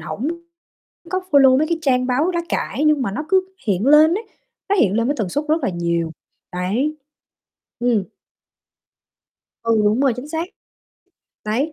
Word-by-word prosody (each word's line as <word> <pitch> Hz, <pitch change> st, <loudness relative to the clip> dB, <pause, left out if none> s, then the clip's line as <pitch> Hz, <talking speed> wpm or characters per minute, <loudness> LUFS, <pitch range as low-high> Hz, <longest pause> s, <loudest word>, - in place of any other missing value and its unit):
hổng 215 Hz, -, -4 dB, 0.8 s
có 370 Hz, +1 st, 0 dB
follow 270 Hz, -3 st, +6 dB
mấy 310 Hz, +3 st, +1 dB
cái 335 Hz, 0 st, 0 dB
trang 255 Hz, -4 st, +2 dB
báo 270 Hz, +8 st, +1 dB
lá 345 Hz, -1 st, -1 dB
cải 295 Hz, -, -2 dB
nhưng 305 Hz, -2 st, +3 dB
mà 235 Hz, -, -1 dB
nó 300 Hz, +10 st, -4 dB
cứ 375 Hz, -1 st, +2 dB, 0.2 s
hiện 200 Hz, +1 st, +1 dB
lên 305 Hz, +3 st, +6 dB
ấy, 435 Hz, -, -3 dB, 0.5 s
nó 405 Hz, -, +3 dB
hiện 210 Hz, -, +3 dB
lên 230 Hz, +2 st, +1 dB
với 285 Hz, -, 0 dB
tần 210 Hz, -5 st, -2 dB
suất 290 Hz, +10 st, -2 dB
rất 315 Hz, 0 st, +1 dB
là -, -, +1 dB
nhiều, 170 Hz, -2 st, -1 dB, 0.4 s
đấy. 210 Hz, +12 st, -1 dB, 0.8 s
Ừm. 240 Hz, -4 st, +1 dB, 1.6 s
Ừ, 230 Hz, -1 st, +2 dB
đúng 210 Hz, +4 st, +2 dB
rồi, 275 Hz, -2 st, +3 dB
chính 255 Hz, +4 st, -7 dB
xác. 325 Hz, +1 st, -2 dB, 1.0 s
Đấy, 250 Hz, +9 st, -1 dB
260 Hz, 170 wpm, -20 LUFS, 215-305 Hz, 1.6 s, follow